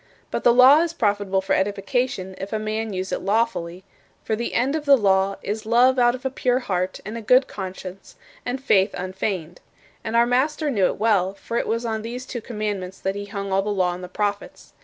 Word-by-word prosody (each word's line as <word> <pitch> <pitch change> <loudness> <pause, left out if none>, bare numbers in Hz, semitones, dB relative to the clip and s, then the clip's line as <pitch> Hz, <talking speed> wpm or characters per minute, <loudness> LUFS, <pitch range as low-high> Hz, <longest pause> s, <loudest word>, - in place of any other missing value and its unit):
But - - -2
the 240 - +6
law 260 +5 +7
is 335 -1 -1
profitable 205 - 0
for 190 - -1
edification 200 0 -1
if 195 - -6
a 220 - 0
man 215 +1 -3
use 185 0 -4
it - - -2
lawfully: 195 -4 -1 0.4
for 220 - -1
the 235 +2 -4
end 265 +5 +1
of 305 -2 -3
the 280 -1 +7
law 195 -2 +2
"is 215 +2 -3
love 245 +3 +4
out 240 0 +4
of 255 +1 -11
a 265 - 0
pure 250 -1 +1
heart, 185 -7 -2
and 220 +3 -5
a - - -8
good 250 +5 +4
conscience, 190 -1 -8 0.3
and 250 +2 -3
faith 200 -7 +2
unfeigned." 185 -2 -4 0.4
And 225 +1 -3
our 235 0 +5
Master 290 +5 +1
knew 200 -7 +3
it - - -3
well, 200 -3 +2
for 230 - -7
it - - -1
was 230 +1 -1
on 220 -1 -2
these 245 +3 -6
two 245 -2 -6
commandments 210 -5 -4
that 190 - -1
he 205 0 -5
hung 200 -1 -5
all 195 - +3
the 205 - -4
Law 185 -3 +1
and 180 +1 -8
the 180 - -7
Prophets. 205 +1 -4
215 Hz, 220 wpm, -23 LUFS, 190-245 Hz, 0.4 s, law